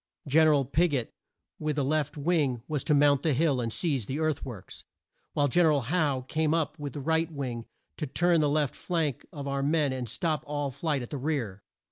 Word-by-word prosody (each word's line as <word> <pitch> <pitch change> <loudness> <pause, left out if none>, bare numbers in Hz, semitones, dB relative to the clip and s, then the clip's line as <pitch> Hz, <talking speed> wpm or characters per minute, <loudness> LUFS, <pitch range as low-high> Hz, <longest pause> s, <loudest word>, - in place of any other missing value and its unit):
Gen 155 +3 +5
er 155 - +5
al 140 -2 +1
Pig 160 +3 +2
ot, 125 -4 -1 0.5
with 150 -1 -1
the 145 - 0
left 150 +1 0
wing, 145 -6 +1
was 150 -4 -2
to 150 - +2
mount 145 -1 +4
the 155 -1 +1
hill 140 -3 +2
and 115 -1 -2
seize 135 - -1
the 135 - -3
earth 155 -2 0
works, 105 -8 -9 0.5
while 145 -1 +2
Gen 170 +5 +4
er - - +5
al 145 -2 +2
Howe 145 0 0
came 155 +1 +1
up 160 -1 -1
with 145 -3 -5
the - - -5
right 160 +4 0
wing 125 -6 -4 0.3
to 155 - -3
turn 175 +4 +2
the 150 - +2
left 145 -2 +1
flank 160 -7 -2
of 140 -2 -6
our 140 0 -1
men 145 -1 +2
and 125 -3 -4
stop 155 - -1
all 145 -1 -2
flight 140 0 -2
at 120 - -9
the 145 - -3
rear. 125 -9 -2
145 Hz, 225 wpm, -28 LUFS, 135-155 Hz, 0.5 s, Gen